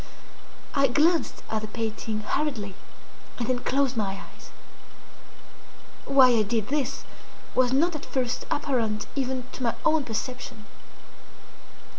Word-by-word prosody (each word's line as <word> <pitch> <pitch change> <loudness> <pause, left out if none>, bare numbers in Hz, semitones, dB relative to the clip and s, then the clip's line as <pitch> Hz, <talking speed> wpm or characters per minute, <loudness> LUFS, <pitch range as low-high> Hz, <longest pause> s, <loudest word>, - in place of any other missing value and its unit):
I 275 -1 +4
glanced 315 +6 +2
at 220 -1 0
the 215 - -4
painting 220 0 -3
hurriedly, 215 -4 -1 0.6
and 240 - -1
then 255 -1 +1
closed 270 +1 +1
my 195 -3 -1
eyes. - - -15 1.6
Why 270 -2 +7
I 230 -2 +4
did 220 +1 0
this 285 -2 -1 0.5
was 255 -1 +3
not 320 +6 +3
at 305 - -5
first 250 -2 -1
apparent 230 -7 0
even 260 -2 -1
to - - -9
my 235 -2 +1
own 315 -1 +4
perception. 230 -2 -5
250 Hz, 125 wpm, -27 LUFS, 220-275 Hz, 1.6 s, Why